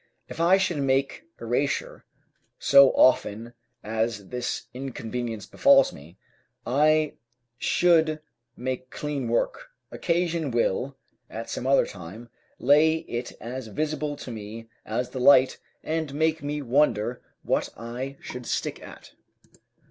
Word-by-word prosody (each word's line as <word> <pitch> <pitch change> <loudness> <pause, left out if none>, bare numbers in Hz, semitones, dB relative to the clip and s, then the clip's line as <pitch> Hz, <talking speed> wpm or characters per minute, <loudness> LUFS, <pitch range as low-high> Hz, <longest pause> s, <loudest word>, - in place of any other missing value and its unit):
If - - -9
I 175 +3 +5
should 190 -4 0
make 135 - 0
erasure - - -2 0.5
so 140 -1 +7
often 115 -2 +3 0.3
as 110 -2 -2
this 125 -1 -3
inconvenience 120 -4 -5
befalls 275 - +4
me, 80 +6 -14 0.5
I 155 +4 +3 0.5
should 160 -3 +3 0.4
make 130 +1 -4
clean 140 -2 -4
work; - - -1 0.2
occasion 170 -3 -1
will, 125 +3 -1 0.3
at 115 +1 -7
some 130 - -3
other 135 - +4
time, 100 +6 -10 0.3
lay 155 +4 +4
it 120 +1 -4
as 125 +1 -6
visible 150 +5 -2
to 135 -3 -8
me 110 +1 -8 0.2
as 120 +3 -2
the 130 - -5
light, 130 0 +5 0.2
and 160 -2 -2
make 160 +1 +1
me 145 +1 -3
wonder 125 -3 +1 0.2
what - - 0
I 125 +4 -6
should 125 -1 -8
stick - - -2
at. - - -12
130 Hz, 125 wpm, -26 LUFS, 115-155 Hz, 0.5 s, so